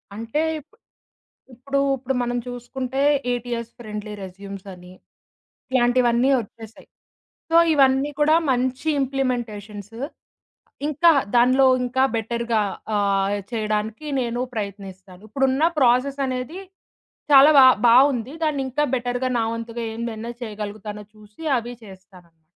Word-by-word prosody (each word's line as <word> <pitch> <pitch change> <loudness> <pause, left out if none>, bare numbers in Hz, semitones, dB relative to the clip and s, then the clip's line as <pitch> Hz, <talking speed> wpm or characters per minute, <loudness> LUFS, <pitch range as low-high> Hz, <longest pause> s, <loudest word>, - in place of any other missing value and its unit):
అంటే 230 +7 -2 0.2
ఇపు 310 +9 -21 0.8
ఇప్పుడు 275 +4 -3 0.2
ఇప్పుడు 265 +1 -3
మనం 245 0 -2
చూసుకుంటే, 250 +2 -5 0.3
8 245 -1 -2
ఇయర్స్ 235 -1 -4
ఫ్రెండ్లీ 210 -2 -7
రెస్యూమ్సని, 190 -1 -10 0.8
ఇలాంటివన్నీ 245 0 +3
వచ్చేసాయి. 225 0 -12 0.6
సో, - - +2 0.2
ఇవన్నీ 270 0 +3
కూడా 305 +1 +4 0.2
మంచి 255 +3 -1
ఇంప్లిమెంటేషన్స్, 225 -6 -3 0.9
ఇంకా 310 +3 +4 0.2
దానిలో 255 +3 +5 0.2
ఇంకా 260 +2 +1
బెటర్‌గా 230 0 -1 0.4
ఆహ్, 200 0 +1
చేయడానికి 215 +4 -2
నేను 240 0 -2
ప్రయత్నిస్తాను, 195 -3 -7
ఇప్పుడున్న 270 +4 +1 0.2
ప్రాసెసనేది 260 +4 0 0.7
చాలా 280 +2 +8
బా 265 - +9 0.2
బావుంది. 255 +1 +4
దాన్నింకా 280 -1 -1
బెటర్‌గా 245 +1 -2
నా - - +1
వంతుగా 230 0 -5
ఏందైనా 230 0 -5
చేయగలుగుతానో 210 -1 -7
చూసి 210 +4 -17 0.2
అవి 240 +1 -5
చేస్తానన్నమాట. 185 -4 -17
240 Hz, 105 wpm, -22 LUFS, 210-260 Hz, 0.9 s, బా